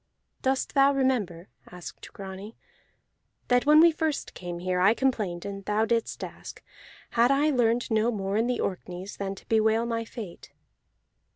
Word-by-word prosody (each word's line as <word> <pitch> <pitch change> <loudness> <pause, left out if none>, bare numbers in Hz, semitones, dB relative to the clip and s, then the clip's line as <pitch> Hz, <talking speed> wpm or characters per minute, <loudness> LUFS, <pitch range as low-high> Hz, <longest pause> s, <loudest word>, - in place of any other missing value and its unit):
"Dost 265 0 0
thou 275 0 +5
remember," 230 -11 0 0.2
asked 180 -1 -10
Grani, 195 +2 -9 0.9
"that 245 +2 +3
when 300 +1 +8
we 335 +1 +7
first 315 -2 -2
came 175 -1 -6
here 180 +1 -1
I 200 +5 +5
complained, 210 -11 -1
and 195 0 -6
thou 210 +2 +1
didst 230 0 -1
ask: - - -9 0.5
Had 235 +1 +4
I 285 +3 +3
learned 240 -2 +1
no 220 +1 +3
more 200 -3 -2
in 225 +2 +2
the 250 - -1
Orkneys 185 +1 -4
than 195 -1 -3
to - - -15
bewail 220 +1 +2
my 230 -1 -2
fate?" 220 -6 -9
220 Hz, 160 wpm, -27 LUFS, 195-250 Hz, 0.9 s, when